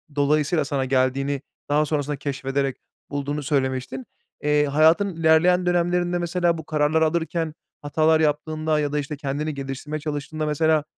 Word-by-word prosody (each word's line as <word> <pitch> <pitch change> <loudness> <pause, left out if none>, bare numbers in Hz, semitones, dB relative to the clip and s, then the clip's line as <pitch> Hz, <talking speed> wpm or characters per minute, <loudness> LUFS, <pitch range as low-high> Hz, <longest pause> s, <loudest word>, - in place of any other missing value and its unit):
dolayısıyla 150 +2 +2
sana 140 -2 -1
geldiğini 135 +1 0 0.3
daha 150 +1 +3
sonrasında 145 -1 -1
keşfederek 135 -1 -2 0.3
bulduğunu 145 +1 -3
söylemiştin. 130 -2 -1 0.4
Eee, 150 0 +3
hayatın 160 +6 +3
ilerleyen 165 +3 +4
dönemlerinde, 175 0 +1
mesela, 175 0 0
bu 160 - -7
kararları 155 +1 +2
alırken 165 0 -1 0.3
hatalar 155 +2 +2
yaptığında 155 0 0
ya 145 -1 -1
da 150 - 0
işte 150 +1 -5
kendini 145 +2 -3
geliştirmeye 140 +2 -5
çalıştığında, 150 +1 -4
mesela, 155 0 +2
150 Hz, 135 wpm, -23 LUFS, 140-160 Hz, 0.4 s, ilerleyen